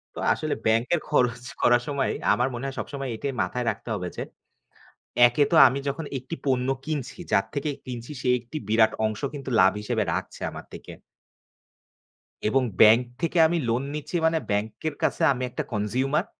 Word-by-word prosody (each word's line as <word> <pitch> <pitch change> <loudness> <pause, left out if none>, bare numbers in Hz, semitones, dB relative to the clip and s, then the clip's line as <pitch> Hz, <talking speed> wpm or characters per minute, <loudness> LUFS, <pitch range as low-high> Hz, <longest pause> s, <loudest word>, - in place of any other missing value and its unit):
তো - - -6
আসলে - - -2
ব্যাংকের 115 +9 +2
খরচ 125 -4 +1 0.2
করার 120 0 +5
সময় 140 -2 0 0.2
আমার 125 - +1
মনে 120 +2 -5
হয় 135 -1 -4
সবসময় 135 -2 -5
এটাই 140 +4 -3
মাথায় 120 +7 -2
রাখতে - - -5
হবে 90 -3 -4
যে, - - -2 1.0
একে 120 +4 +2
তো 170 - +3
আমি 130 +3 -3
যখন 140 +4 -3
একটি 130 +6 -7
পণ্য 130 -1 +1 0.2
কিনছি, 150 -2 -4
যার 100 - +3
থেকে 145 +1 -1
কিনছি 120 +1 -7
সে 130 - -1
একটি 120 +5 -9
বিরাট 110 0 +4
অংশ 110 0 -4
কিন্তু 135 -2 -6
লাভ 95 - +6
হিসেবে 110 +1 -1
রাখছে - - -4
আমার - - -9
থেকে। - - -10 1.6
এবং 130 +4 +2 0.2
ব্যাংক 110 +2 +8 0.2
থেকে 170 +1 -1
আমি 170 +2 0
লোন 120 +3 +1
নিচ্ছি 150 +3 -6
মানে, 160 0 +3
ব্যাংকের 110 +9 -2
কাছে - - 0
আমি 130 0 -4
একটা - - -4
কনসিউমার 130 - 0
125 Hz, 170 wpm, -25 LUFS, 115-140 Hz, 1.6 s, ব্যাংক